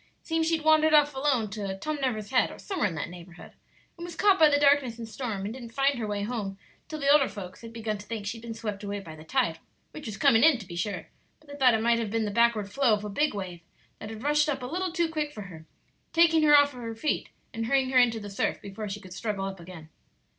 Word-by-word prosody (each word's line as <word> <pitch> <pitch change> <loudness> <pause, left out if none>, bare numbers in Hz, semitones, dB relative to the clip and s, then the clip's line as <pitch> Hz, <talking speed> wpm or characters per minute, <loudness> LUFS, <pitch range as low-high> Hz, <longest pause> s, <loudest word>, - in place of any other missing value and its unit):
Seems 325 -1 0
she'd 325 -2 0
wandered 310 0 +5
off 295 -1 +5
alone 265 -6 0
to 200 -2 -4
Tom 305 +8 -3
Never's 220 -4 -2
Head, 255 - +3
or - - -10
somewhere 375 - -1
in 175 - -5
that 160 +2 -4
neighborhood, 175 0 -12 0.4
and 340 - -9
was 345 -1 -7
caught 395 +1 +4
by 310 -1 +7
the 285 0 +3
darkness 280 -5 +3
and 230 -1 -7
storm, 220 -4 -4
and 210 - -4
didn't 240 -3 -10
find 275 -1 +2
her 220 - -2
way 205 -1 -2
home 205 -4 -4 0.3
till 310 - -6
the 280 - -2
older 285 -1 +5
folks 185 -3 -9
had 230 -1 -9
begun 220 -2 -4
to 205 - -12
think 220 -3 -5
she'd 225 +3 -5
been 230 -1 -7
swept 210 -3 -5
away 205 0 -3
by 165 -5 -10
the 155 - -12
tide, 160 0 0 0.3
which 305 -5 -9
was 215 -2 -5
coming 225 +2 +4
in, 315 -4 +6
to 215 - -10
be 175 -2 -9
sure; 180 -1 -3 0.3
but 310 - -25
they 285 - -8
thought 255 -4 +5
it 220 - -1
might 235 0 +3
have 225 -2 -2
been 225 +1 0
the 205 - -2
backward 225 -2 +2
flow 260 -4 +3
of 210 0 -7
a - - -4
big 295 +5 0
wave 180 -4 -6 0.4
that 215 - -7
had 220 +1 -8
rushed 295 +1 +2
up 270 -3 -2
a - - -3
little 360 +7 -2
too 340 0 +1
quick 305 -2 -3
for 215 -8 -8
her, 160 -4 -12 0.5
taking 330 -1 +5
her 295 -1 +7
off 285 0 +5
her 235 -3 -7
feet 295 +7 -2 0.2
and 225 -1 -3
hurrying 265 0 +2
her 255 - +5
into 235 -2 +3
the 205 -1 -8
surf 195 - -1
before 205 +1 -7
she 200 +1 -5
could 185 -2 -12
struggle 200 -1 -3
up 195 -1 -6
again." 170 -2 -11
230 Hz, 270 wpm, -27 LUFS, 200-285 Hz, 0.5 s, by